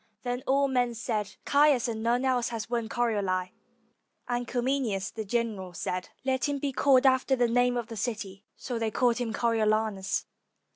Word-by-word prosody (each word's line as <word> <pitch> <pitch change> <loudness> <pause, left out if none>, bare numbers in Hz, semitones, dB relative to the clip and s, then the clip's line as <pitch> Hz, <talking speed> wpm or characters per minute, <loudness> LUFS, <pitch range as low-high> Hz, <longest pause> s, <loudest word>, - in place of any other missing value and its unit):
Then 245 0 -2
all 275 +1 +3
men 245 -3 0
said, 215 -3 -3
"Caius 285 -4 +4
and 220 -2 -3
none 240 +3 +1
else 250 -2 +1
has 225 -2 -4
won 235 -1 -2
Corioli"; 200 -7 0 0.8
and 245 0 -2
Cominius 245 -6 -1
the 220 - -5
general 210 -4 -2
said, 180 +2 -3 0.2
"Let 260 -1 +1
him 285 - -1
be 280 0 -2
called 270 0 +4
after 260 0 +4
the 245 -2 +2
name 245 +1 +2
of 240 - -2
the 225 - -8
city." 205 -3 -4
So 245 -3 -4
they 225 -1 0
called 235 +1 +2
him 240 -2 -2
Coriolanus. 215 -3 0
235 Hz, 175 wpm, -28 LUFS, 215-250 Hz, 0.8 s, Caius